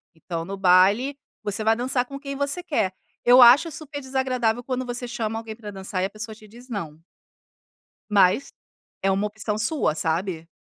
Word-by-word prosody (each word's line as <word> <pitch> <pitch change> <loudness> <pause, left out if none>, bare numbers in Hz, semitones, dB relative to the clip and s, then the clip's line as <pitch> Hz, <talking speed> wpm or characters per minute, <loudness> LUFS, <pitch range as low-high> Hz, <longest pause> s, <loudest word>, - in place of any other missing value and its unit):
Então, 165 0 -5
no 195 +2 -5
baile 195 +9 +4 0.3
você 205 +1 -1
vai 225 +1 +3
dançar 250 +1 0
com 275 +2 -8
quem 275 -1 -6
você 285 +5 -1
quer. 220 - 0 0.3
Eu 250 +1 +8
acho 265 +8 +8
super 290 -1 -5
desagradável, 255 -3 -1
quando 255 0 -3
você 245 0 -4
chama 225 -2 -3
alguém 220 -1 -8
para 215 -3 -9
dançar 190 -1 -4
e 185 - +1
a - - -3
pessoa 215 +1 -7
te 215 -1 -16
diz 240 +4 -15
não. 160 -8 -5 1.1
Mas, 200 +5 +3 0.5
é 195 - +2
uma 195 +2 +1
opção 210 0 -3
sua, 230 - +1
sabe. 165 +1 -2
225 Hz, 180 wpm, -24 LUFS, 195-255 Hz, 1.1 s, Eu